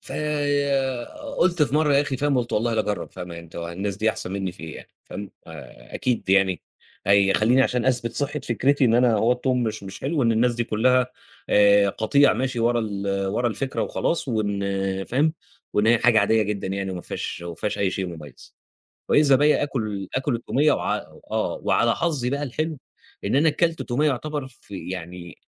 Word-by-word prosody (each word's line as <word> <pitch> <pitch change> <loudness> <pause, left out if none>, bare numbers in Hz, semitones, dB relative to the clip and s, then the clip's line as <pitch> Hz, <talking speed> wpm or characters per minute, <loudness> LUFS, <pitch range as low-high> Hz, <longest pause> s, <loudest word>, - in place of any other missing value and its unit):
فقُلت 145 - -1
في 145 - +1
مرّة 150 -2 +3
يا 140 - +5
أخي 145 -2 -2
فاهم، 145 -1 +1
قُلت 120 -1 -3
والله 115 +2 +1
لأجرب 105 -2 -2
فاهم 90 -1 -8
أنت 85 -1 -10
هو 85 0 -4
الناس 95 +3 -3
دي 110 +1 +2
أحسن 95 - -5
منّي 95 -2 -3
في 90 - -10
إيه 80 -2 -7
يعني، - - -12 0.2
فاهم 100 -1 -7 0.2
آآ، 65 -7 -12
أكيد 125 -6 -1
يعني 95 -2 +3 0.4
هيخلّيني 100 +5 +4
علشان 125 -2 0
أثبت 120 -3 0
صحة 145 +1 -2
فكرتي 135 +4 +1
إن 115 -1 +3
أنا 120 -2 +4
هو 115 +4 +3
التوم 125 0 0
مش 110 -2 -3
مش 95 0 -8
حلو، 145 +1 0
إن 115 -1 +3
الناس 120 +2 +2
دي 120 0 -1
كلّها 125 +3 +2 0.4
آآ، 100 -1 +5
قطيع 125 +8 +3
ماشي 125 +2 -2
ورا 120 0 +2
ال 100 -2 -2
ورا 120 +5 0
الفكرة 130 +5 -2
وخلاص 165 -4 -1
وإن 100 -3 -1
فاهم، 150 +5 +1 0.4
وإن 105 +1 +2
هي 120 0 +5
حاجة 120 -2 +4
عادية 110 +2 +3
جدًا 105 -1 -3
يعني 95 0 -3
وما 90 - -5
فيهاش 85 - -5
ما 85 -1 -6
فيهاش 105 +5 -3
أي 95 -2 +1
شيء 95 -1 -3
مميّز، 80 -4 -11 0.5
وإذا 140 -3 +5
بيَّ 150 +2 +3
آكل 105 -9 -3
آكل 130 -1 0
التومية 140 +5 +2
وع - - 0 0.3
آه - - -1
وعلى - - +3
حظي 140 -7 -1
بقى 140 +1 -2
الحلو، 155 +3 -3 0.5
إن 105 +7 +1
أنا 155 +2 +4
كلت 165 +2 0
تومية 140 +4 0
يُعتبر 145 +1 -3
في 95 -3 -8
يعني 90 -1 -7
115 Hz, 190 wpm, -24 LUFS, 100-135 Hz, 0.5 s, يا